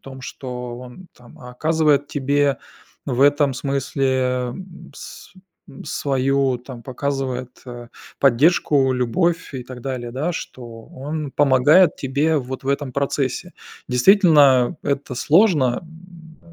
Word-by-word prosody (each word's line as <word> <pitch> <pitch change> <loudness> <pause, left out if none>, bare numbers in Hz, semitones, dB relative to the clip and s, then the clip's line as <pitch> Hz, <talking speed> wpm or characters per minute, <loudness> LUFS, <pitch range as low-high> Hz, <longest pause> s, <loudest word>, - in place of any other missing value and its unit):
том, 135 -1 -11
что 125 -2 -7
он 125 +9 -12
там, 120 -1 -18
оказывает 145 +3 0
тебе 140 -1 0 0.5
в 130 -2 -2
этом 145 0 +4
смысле, 135 0 -2 0.5
м, 185 -2 -12
с - - -11 0.5
свою, 135 -2 0
там, 125 -1 -11
показывает, 130 -2 -4
а, 120 -1 -9 0.3
поддержку, 140 0 +3
любовь 165 +9 -1
и 130 -2 -6
так 125 0 -10
далее, 120 -3 -5
да, 145 +7 -2
что 120 -7 -9
он 145 +1 -6
помогает 145 +6 +4
тебе 145 +4 0
вот 130 0 -6
в - - -5
этом 140 -1 -1
процессе. 140 +5 -2 0.4
Действительно, 140 - +5
это 140 -2 -2
сложно, 150 - +3
м, 165 -1 -16
135 Hz, 120 wpm, -21 LUFS, 125-150 Hz, 0.5 s, Действительно